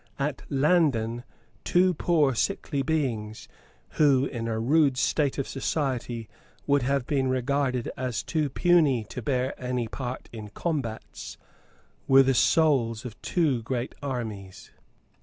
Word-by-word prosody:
At 140 0 -2
Landen 135 -6 +2 0.4
two 180 +1 +3
poor 155 -4 +2
sickly 145 - -1
beings, 125 -8 -2 0.5
who, 140 -3 +5
in 115 -4 -4
a 110 -1 -2
rude 140 +2 +3
state 140 +1 +1
of 140 - -2
society, 125 -5 -2 0.4
would 140 -1 +3
have 135 0 0
been 135 -2 0
regarded 130 -1 0
as 125 -2 -3
too 155 -3 -1
puny 155 -6 +3
to - - -6
bear 130 -2 -1
any 125 -2 -1
part 125 +2 -6
in 110 -2 -7
combats, 125 -2 -4 0.7
were 135 0 +7
the 135 0 +2
souls 130 -6 +2
of 115 -3 -9
two 150 -9 +1
great 120 +2 -3
armies. 110 -9 -6
130 Hz, 130 wpm, -26 LUFS, 120-145 Hz, 0.7 s, were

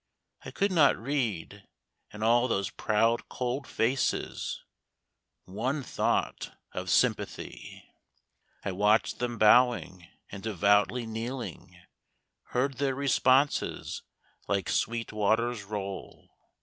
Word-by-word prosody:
I - - -7
could 200 0 0
not 155 -6 +5
read, 110 - -3 0.4
in 105 +1 -6
all 120 +2 +4
those 100 -5 -1
proud 115 +2 +1
cold 125 +2 -3
faces, 125 +4 -1 0.8
One 130 +10 -2
thought - - -1
of - - -5
sympathy. - - -1 0.8
I - - -1
watched 105 +4 +2
them 120 -1 -2
bowing 105 -6 +4 0.2
and 100 - -7
devoutly 105 +3 +2
kneeling, 115 +3 -6 0.7
Heard 130 +2 -1
their 135 -2 +1
responses 140 0 +1 0.5
like 100 -3 0
sweet 115 -1 -1
waters 110 +2 +1
roll. 100 -2 -6
115 Hz, 100 wpm, -29 LUFS, 105-130 Hz, 0.8 s, not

